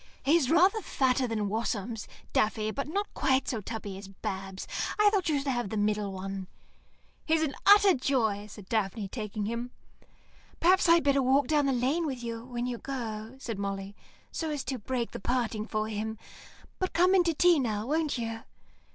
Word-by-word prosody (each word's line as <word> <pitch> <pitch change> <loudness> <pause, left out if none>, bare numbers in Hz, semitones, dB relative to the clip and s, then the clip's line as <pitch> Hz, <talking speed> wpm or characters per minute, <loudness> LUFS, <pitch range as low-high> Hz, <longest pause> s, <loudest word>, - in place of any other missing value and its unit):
"He's 295 -2 +3
rather 370 +7 +4
fatter 260 -6 +1
than 215 -3 -1
Wasums, 220 +1 -2 0.3
Daffy, 215 0 +1
but 275 +5 -3
not 405 +6 -2
quite 265 0 +1
so 225 -4 -2
tubby 205 -2 -6
as 195 - -10
Babs. 195 -1 -6 0.3
I 420 -1 +5
thought 390 -5 +1
you 300 - +2
should 275 - -3
have 240 -6 -1
the 220 - -3
middle 210 -1 0
one." 190 0 -5 0.8
"He's 320 0 +2
an 290 -3 -1
utter 405 -1 +8
joy," 225 -7 0
said 205 -2 -12
Daphne, 210 -1 -1
taking 210 -2 -4
him. 235 +3 -3 0.9
"Perhaps 365 +1 +4
I'd 335 0 +6
better 280 -1 +3
walk 265 +2 +3
down 295 -2 +2
the - - +3
lane 270 +7 +1
with 255 -4 -4
you 230 -1 -4
when 245 -1 -4
you 245 -2 -3
go," 230 -3 -5
said 225 -6 -5
Molly, 195 0 -4 0.4
"so 320 - -3
as 295 -3 -2
to 260 -1 -3
break 240 +2 -2
the - - -6
parting 230 -2 -1
for 215 0 -1
him. 220 +1 -3 0.6
But 370 - -1
come 360 +2 +4
in 375 -2 +5
to 335 -2 +1
tea 350 0 +5
now, 215 -4 -1
won't 305 +1 0
you." 225 -1 -4
240 Hz, 185 wpm, -29 LUFS, 215-290 Hz, 0.9 s, utter